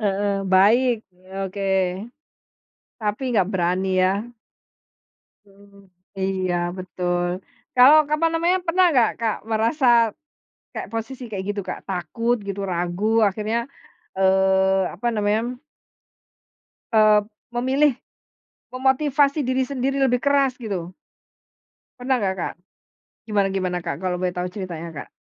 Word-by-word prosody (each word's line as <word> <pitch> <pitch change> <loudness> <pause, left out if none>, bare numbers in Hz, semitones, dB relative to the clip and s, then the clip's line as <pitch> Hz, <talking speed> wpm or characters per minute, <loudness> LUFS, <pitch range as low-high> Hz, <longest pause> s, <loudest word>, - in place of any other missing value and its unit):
heeh, 205 -1 0 0.2
baik, 230 +7 +5 0.2
e 185 +1 -25 0.2
oke. 195 +1 -5 1.4
Tapi 210 +1 -2
nggak 195 -4 +2
berani 180 +1 0 0.2
ya? 185 - +4 1.4
Mhm 195 -1 -23 0.2
mhm. 200 0 -18 0.4
Iya, 190 -2 -1 0.2
betul. 175 -1 -2 0.5
Kalau, 265 +5 +8
apa 305 +2 +1
namanya, 340 +3 +2
pernah 360 +2 +3
nggak 245 -6 +4
Kak 225 -2 0
merasa, 230 +6 +1 0.9
kayak - - -6
posisi 230 +4 -5
kayak 195 -3 -4
gitu 200 - -3
Kak? - - -4
Takut 195 +6 -1
gitu, 200 0 -5
ragu 175 +2 -2 0.2
akhirnya, 215 +3 -1 0.6
eee, 190 0 +3
apa 205 +7 -3
namanya 220 +4 0 1.4
eee, 215 -1 +6 0.3
memilih, 265 +4 +2 0.8
memotivasi 280 +2 +2
diri 260 +1 +1
sendiri 275 0 -1
lebih 250 -2 +2
keras 280 -2 +2
gitu. 195 -8 -5 1.1
Pernah 260 +1 +1
nggak 195 -6 -1
Kak? - - -3 0.7
Gimana 205 -2 +2
gimana 185 -2 -1
Kak, 165 -4 -4
kalau 185 -1 -1
boleh 180 0 -1
tahu 180 0 -3
ceritanya, 175 -4 -7
Kak? - - -8
210 Hz, 120 wpm, -22 LUFS, 185-255 Hz, 1.4 s, Kalau